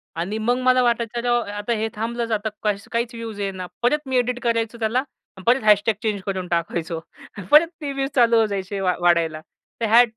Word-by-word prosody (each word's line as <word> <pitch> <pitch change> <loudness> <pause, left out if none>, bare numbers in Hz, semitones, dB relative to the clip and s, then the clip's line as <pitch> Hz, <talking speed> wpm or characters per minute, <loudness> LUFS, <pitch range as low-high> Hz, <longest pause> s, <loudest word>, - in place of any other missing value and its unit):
आणि 180 +6 -3
मग 240 +3 +1
मला 255 0 +4
वाटायचं 235 -1 0
अरे 240 - -3
हो, 240 - +4
आता 205 -1 -2
हे 220 0 -1
थांबलच 230 +2 -3
आता 220 0 0
काही 210 -2 +1
काहीच 235 +1 -1
व्ह्यूज 225 -3 -7
येईना. 190 -2 -4
परत 245 +5 +3
मी 260 -1 +1
एडिट 245 0 0
करायचो 230 -1 0
त्याला, 230 +3 +1 0.4
परत 245 +1 +3
# 210 +1 +4
चेंज 210 -3 -1
करून 190 -2 -3
टाकायचो. 170 -1 -2 0.5
परत 305 +3 +8
ते 290 -2 -3
व्ह्ज 270 0 -2
चालू 235 -3 +5
होऊन 225 -1 +4
जायचे 200 -1 -4
वा 185 -1 +1
वाढायला. 170 -3 +2 0.4
तर - - +2
ह्या 230 +3 +7
225 Hz, 200 wpm, -22 LUFS, 200-240 Hz, 0.5 s, परत